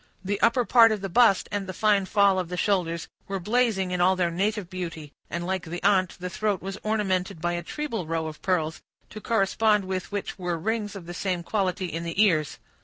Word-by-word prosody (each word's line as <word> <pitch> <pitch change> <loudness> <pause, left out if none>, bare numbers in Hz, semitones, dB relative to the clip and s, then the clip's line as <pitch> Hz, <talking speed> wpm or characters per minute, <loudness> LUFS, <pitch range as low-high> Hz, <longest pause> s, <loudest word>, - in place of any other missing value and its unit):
The 200 +1 -2
upper 235 +1 +3
part 230 +2 +6
of 215 -2 -2
the 195 - -4
bust, 230 -4 +5
and 205 -2 -2
the 185 - -6
fine 205 -2 +2
fall 200 -2 +4
of 180 -2 -3
the 180 - -4
shoulders, 175 -4 0 0.2
were 195 0 -3
blazing 210 -2 +1
in 180 -1 0
all 185 +2 +4
their 175 -2 0
native 200 +2 -1
beauty, 165 -5 -6 0.2
and, 170 0 -3
like 190 0 -2
the 175 +2 -6
aunt, 185 -3 +2
the 180 - -4
throat 205 +1 -1
was 195 +2 -6
ornamented 190 -6 -1
by 175 +2 -1
a 175 - -2
treble 225 - -4
row 165 0 -1
of 155 -1 -7
pearls, 160 -4 -1 0.3
to 215 - -8
correspond 210 -1 +2
with 185 0 -4
which 200 -1 -4
were 175 -2 -2
rings 210 +3 -2
of 190 -4 -8
the 175 - -7
same 180 -1 -2
quality 190 -1 -1
in 165 -1 -4
the 170 +2 -4
ears. 165 -8 +3
190 Hz, 220 wpm, -26 LUFS, 175-210 Hz, 0.3 s, part